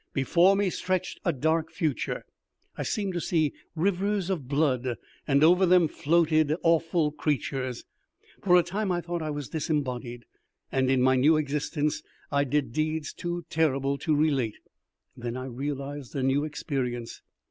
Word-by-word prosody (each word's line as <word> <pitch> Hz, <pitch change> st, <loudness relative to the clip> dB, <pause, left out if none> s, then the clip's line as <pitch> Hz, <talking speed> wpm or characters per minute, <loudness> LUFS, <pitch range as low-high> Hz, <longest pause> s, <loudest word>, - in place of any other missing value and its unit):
Before 175 Hz, +8 st, +4 dB
me 195 Hz, -2 st, +1 dB
stretched 185 Hz, 0 st, -2 dB
a 175 Hz, -, +2 dB
dark 160 Hz, +3 st, 0 dB
future. 155 Hz, -6 st, -2 dB, 0.5 s
I -, -, -5 dB
seemed 200 Hz, -3 st, -2 dB
to 175 Hz, -, -2 dB
see 155 Hz, -4 st, +1 dB, 0.2 s
rivers 195 Hz, +2 st, 0 dB
of 155 Hz, -9 st, -3 dB
blood, 130 Hz, -4 st, +1 dB, 0.3 s
and 140 Hz, 0 st, +4 dB
over 180 Hz, +4 st, +6 dB
them 175 Hz, -2 st, +5 dB
floated 155 Hz, 0 st, +2 dB
awful 165 Hz, -1 st, +2 dB
creatures. 135 Hz, -4 st, -2 dB, 0.6 s
For 180 Hz, -2 st, +5 dB
a 175 Hz, -, +5 dB
time 195 Hz, +3 st, -2 dB
I 175 Hz, -1 st, 0 dB
thought 170 Hz, 0 st, -4 dB
I 155 Hz, -, -3 dB
was 145 Hz, -3 st, -4 dB
disembodied, 130 Hz, -6 st, -3 dB, 0.5 s
and 130 Hz, -1 st, +1 dB
in 130 Hz, -1 st, +3 dB
my 130 Hz, 0 st, +4 dB
new 150 Hz, +5 st, +5 dB
existence 150 Hz, 0 st, -1 dB, 0.3 s
I 140 Hz, 0 st, +2 dB
did 140 Hz, -3 st, -1 dB
deeds 155 Hz, 0 st, -1 dB
too 175 Hz, -1 st, -4 dB
terrible 140 Hz, -3 st, +1 dB
to 155 Hz, -3 st, +1 dB
relate. 140 Hz, -7 st, +1 dB, 0.6 s
Then 120 Hz, 0 st, -5 dB
I 130 Hz, -, -5 dB
realized 140 Hz, +1 st, -5 dB
a 135 Hz, -, -1 dB
new 135 Hz, +3 st, +2 dB
experience. 130 Hz, -6 st, -4 dB
150 Hz, 155 wpm, -27 LUFS, 135-170 Hz, 0.6 s, over